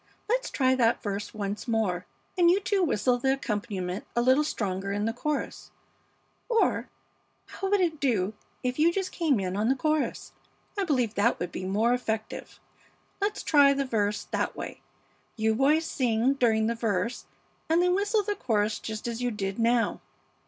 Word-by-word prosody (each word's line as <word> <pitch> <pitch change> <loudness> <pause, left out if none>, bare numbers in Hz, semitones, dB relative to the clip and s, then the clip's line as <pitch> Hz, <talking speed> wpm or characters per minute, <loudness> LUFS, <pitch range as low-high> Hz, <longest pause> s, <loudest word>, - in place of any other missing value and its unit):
Let's - - 0
try 260 -2 +2
that 235 -3 +2
verse 205 -1 -3
once 205 +2 -4
more, 195 -6 0 0.3
and 350 -2 +5
you 370 +3 +4
two 395 0 0
whistle 245 - +2
the 265 +2 +2
accompaniment 205 -7 -3
a 240 - +2
little 260 +4 +4
stronger 195 -8 -2
in 205 +1 -1
the 225 - 0
chorus; 295 +4 -3 0.8
or 460 -2 +1 0.6
how 390 - -4
would 405 -1 +3
it 325 -4 0
do 215 -8 +1 0.3
if 250 +2 -2
you 330 +2 +5
just 380 +1 -2
came 310 - +1
in 185 -1 -2
on 215 +3 +1
the 265 - +3
chorus? 305 +2 -1 0.4
I 400 -2 0
believe 250 - +1
that 225 +3 +2
would 175 0 -3
be 185 - -5
more 215 +5 +2
effective. 220 -3 -4 0.6
Let's 410 +1 -1
try 285 -2 +6
the 275 - 0
first 255 - -13
verse 210 -2 0
that - - -1
way; - - -7 0.5
you 220 0 +1
boys 290 +7 +3
sing 245 -2 +1
during 225 -5 +2
the 230 - +1
verse 225 0 -2 0.4
and 325 +1 +4
then 360 0 +3
whistle 410 +2 +1
the 415 +1 -1
chorus 215 - 0
just 220 +1 -5
as 235 0 -4
you 245 - +1
did 195 -2 -4
now. 230 0 +2
240 Hz, 180 wpm, -27 LUFS, 210-300 Hz, 0.8 s, try